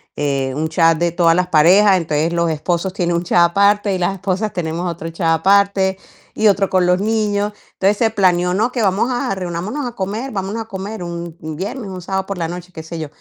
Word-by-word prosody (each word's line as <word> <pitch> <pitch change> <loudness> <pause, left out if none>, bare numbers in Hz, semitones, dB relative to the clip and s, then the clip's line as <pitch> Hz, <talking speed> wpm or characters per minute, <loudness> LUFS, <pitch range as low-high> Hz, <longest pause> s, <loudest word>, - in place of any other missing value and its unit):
Eh, 135 -2 -1
un 160 +1 -2
chat 165 0 +3
de 175 0 +1
todas 170 -1 +3
las 180 0 +1
parejas, 185 +5 +5
entonces 160 0 -1
los 170 -1 +1
esposos 170 +4 -2
tienen 175 -3 0
un 170 - -1
chat 175 - +2
aparte, 200 +1 +2
y - - -1
las 180 +2 0
esposas 195 +2 -2
tenemos 170 0 -3
otro 165 0 -6
chat 165 -1 0
aparte, 195 0 +3 0.4
y 215 - +3
otro 200 -1 +2
con 185 -1 +2
los 180 +2 +2
niños. 210 -1 0 0.2
Entonces 200 +2 +1
se 225 -2 +2
planeó: 180 -3 +2
"No, 225 +6 +1
que 240 -3 -1
vamos 200 +5 +1
a 245 -5 -1
reunámonos 185 - -4
a 240 - -6
comer, 215 +7 -4
vamos 195 0 -3
a 225 - -4
comer", 200 0 -6
un 170 -1 -6
un 155 0 -6
viernes, 200 - -5
un 185 -1 -7
sábado 190 +1 -2
por 195 - -4
la 165 -2 -2
noche, 180 +1 -8
qué 160 -2 -9
sé 165 0 -7
yo. 155 - -4
185 Hz, 225 wpm, -18 LUFS, 170-200 Hz, 0.4 s, parejas